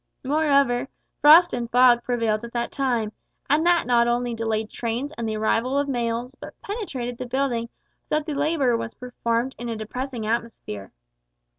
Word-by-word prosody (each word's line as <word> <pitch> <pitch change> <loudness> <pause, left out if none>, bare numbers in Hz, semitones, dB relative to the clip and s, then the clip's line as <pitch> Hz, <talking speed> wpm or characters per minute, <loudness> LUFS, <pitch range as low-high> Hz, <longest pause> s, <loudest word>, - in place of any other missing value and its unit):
Moreover, 280 -3 +2 0.3
frost 330 +4 +8
and 240 -1 -3
fog 245 -1 +5
prevailed 230 -3 0
at 235 - -8
the 235 0 -1
time, 245 -6 0 0.4
and 295 +3 +3
that 350 -1 +4
not 235 -1 +3
only 240 0 0
delayed 220 -1 -1
trains 240 +5 -3
and 230 -1 -3
the 215 - -2
arrival 230 +5 +1
of 285 0 +1
mails, 240 -1 -2
but - - -12
penetrated 265 - -5
the 255 - -4
building 240 -3 -1 0.4
so - - +1
that 305 -1 0
the 310 - -3
labour 285 -4 +1
was 230 0 -4
performed 245 0 -2
in 240 0 -5
a 230 - -2
depressing 240 +2 -5
atmosphere. 220 - -4
245 Hz, 170 wpm, -24 LUFS, 230-275 Hz, 0.4 s, frost